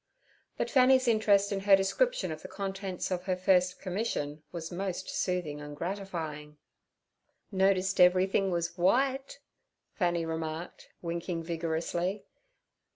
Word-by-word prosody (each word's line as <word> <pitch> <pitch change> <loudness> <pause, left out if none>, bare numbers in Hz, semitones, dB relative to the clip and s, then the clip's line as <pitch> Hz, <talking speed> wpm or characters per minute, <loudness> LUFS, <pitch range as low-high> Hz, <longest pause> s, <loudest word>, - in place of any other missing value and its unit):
But - - -2
Fanny's 260 -1 +5
interest 210 -3 +3
in 200 - 0
her 195 0 +6
description - - +1
of - - -6
the - - -8
contents 195 -2 -4
of 180 0 -2
her 185 -1 +1
first 180 -1 +2
commission 180 -7 -3
was 165 -1 -6
most 185 0 -4
soothing 175 -5 -2
and 145 0 -8
gratifying. 165 -5 -5 0.9
'Notice 190 -1 +2
everything 185 +2 +4
was 170 -2 0
w'ite?' 265 +11 +1 0.6
Fanny 175 -3 0
remarked, 160 +1 -5
winking 170 0 -3
vigorously. 170 +3 -2
185 Hz, 120 wpm, -30 LUFS, 170-195 Hz, 0.9 s, her